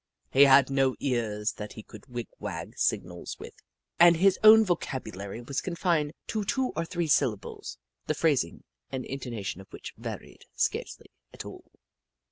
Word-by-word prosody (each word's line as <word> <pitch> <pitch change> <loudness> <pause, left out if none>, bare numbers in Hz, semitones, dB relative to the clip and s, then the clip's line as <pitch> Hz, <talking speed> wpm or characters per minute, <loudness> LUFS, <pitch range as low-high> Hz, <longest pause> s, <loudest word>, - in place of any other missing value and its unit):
He 140 +2 +7
had 135 0 +6
no 135 -1 +2
ears 110 -5 -1
that 105 0 -6
he 110 - -10
could - - -14
wig 120 -3 -5
wag - - -5
signals 90 -1 -2
with, - - -10 0.5
and 170 0 +8
his 190 +2 +4
own 220 +1 +9
vocabu 160 -7 -2
lary 100 +4 -6
was 140 - -1
confined 170 -4 0
to 215 -2 -2
two 260 +5 0
or 165 +1 -1
three 170 0 -2
syllables, 105 - 0 0.3
the 155 - 0
phrasing 145 - +1 0.3
and 130 -1 -4
intonation 115 -8 -5
of 95 - -17
which - - -9
varied - - -8
scarcely - - -2 0.2
at - - -9
all. - - -11
135 Hz, 160 wpm, -28 LUFS, 115-170 Hz, 0.5 s, own